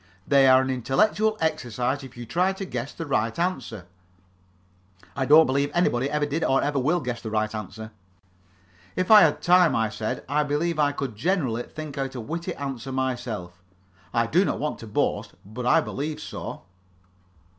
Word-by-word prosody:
"They 140 -1 +5
are 130 0 +6
an 130 - -2
intellectual 215 - +1
exercise, 130 -3 -1
if 130 -2 -12
you 120 - -7
try 180 - +1
to 195 0 -6
guess 130 -4 -5
the 165 - -6
right 115 -6 -1
answer." 130 - -3 1.3
"I 135 -2 -1
don't 155 +2 +8
believe 140 +2 0
anybody 135 -7 +1
ever 150 0 0
did 145 +3 -2
or 135 - +3
ever 145 -1 0
will 160 +7 +1
guess 125 -3 -4
the 110 - -5
right 110 0 -1
answer." 110 +1 -7 1.0
"If 185 +3 0
I 215 -1 +10
had 150 -5 +3
time," 180 -1 +5
I 110 -1 +1
said, 110 0 -4
"I 145 +3 +1
believe 150 +3 -1
I 145 -1 +3
could 135 -5 -5
generally 130 - 0
think 150 +2 -8
out 135 -1 -3
a - - -4
witty 170 +9 -4
answer 135 -2 -5
myself. 120 -9 -3 0.5
I 115 0 +2
do 170 +11 +3
not - - -1
want 150 +1 -3
to 115 - -9
boast, 105 - -1
but 120 +5 -5
I 165 +6 +5
believe 150 +1 -4
so." - - -7
135 Hz, 180 wpm, -25 LUFS, 120-160 Hz, 1.3 s, I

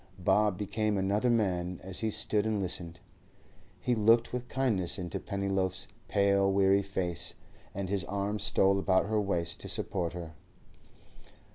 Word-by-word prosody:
Bob 105 -3 +2
became 105 +1 -1
another 100 +5 +1
man 90 -6 0
as 95 0 -5
he 110 - 0
stood 105 0 0
and 110 -2 0
listened. 85 -2 -3 0.8
He 125 - 0
looked 115 +2 +3
with 125 0 -3
kindness 115 -10 0
into 90 -3 -4
Pennyloaf's 95 -2 -1 0.2
pale, 100 -1 +3
weary 95 0 +4
face, 95 -3 -3 0.4
and 100 0 -3
his 100 -1 -1
arm 100 +2 -2
stole 100 0 +3
about 95 -1 +2
her 105 0 +1
waist 85 -4 -1
to - - -7
support 90 -4 -1
her. 85 -2 -7
100 Hz, 145 wpm, -30 LUFS, 95-105 Hz, 0.8 s, weary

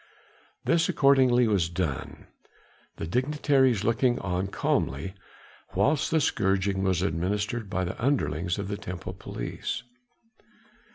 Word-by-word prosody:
This 165 -1 +3
accordingly 130 -3 +4
was 95 -6 +2
done, 85 -6 -4 0.7
the - - -5
dignitaries 130 - +2
looking 120 +2 +2
on 90 0 -2
calmly 80 -3 -1 0.6
whilst 145 0 +2
the 160 - +3
scourging 95 -6 +1
was 95 -2 +1
administered 100 +6 -1
by 95 -2 -1
the 90 +5 -5
underlings 90 - 0
of 100 -1 -3
the 100 0 -3
temple 90 -2 -6
police. 95 - -5
100 Hz, 115 wpm, -27 LUFS, 90-125 Hz, 0.7 s, accordingly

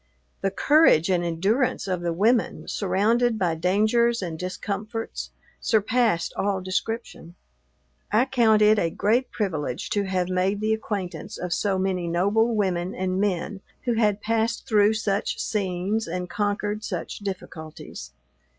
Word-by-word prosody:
The 195 - +1
courage 195 - +4
and 175 -1 +2
endurance 195 +10 0
of 185 -2 -1
the 170 -1 -1
women, 220 +8 +1
surrounded 220 +5 +1
by 175 -5 +1
dangers 215 +7 +2
and 165 -3 -5
discomforts, 205 +5 -4 0.3
surpassed 220 -4 +1
all 200 -1 0
description. 185 -1 -4 0.8
I 220 +4 +4
count 230 -5 +4
it 210 0 +5
a 170 - +1
great 230 +9 +1
privilege 155 - -3
to 205 -1 +1
have 185 -2 0
made 185 +2 0
the 215 +1 +1
acquaintance 195 -6 -4
of 180 -1 -3
so 200 -2 0
many 185 -2 -1
noble 205 +7 +2
women 185 -3 -1
and 185 +1 -1
men 195 0 -1 0.2
who 240 - +1
had 210 -3 +1
passed 225 +1 0
through 210 0 +4
such 205 -2 -1
scenes 200 0 -1
and 180 +1 -3
conquered 205 +1 -2
such - - -4
difficulties. 160 - -7
200 Hz, 140 wpm, -25 LUFS, 180-220 Hz, 0.8 s, it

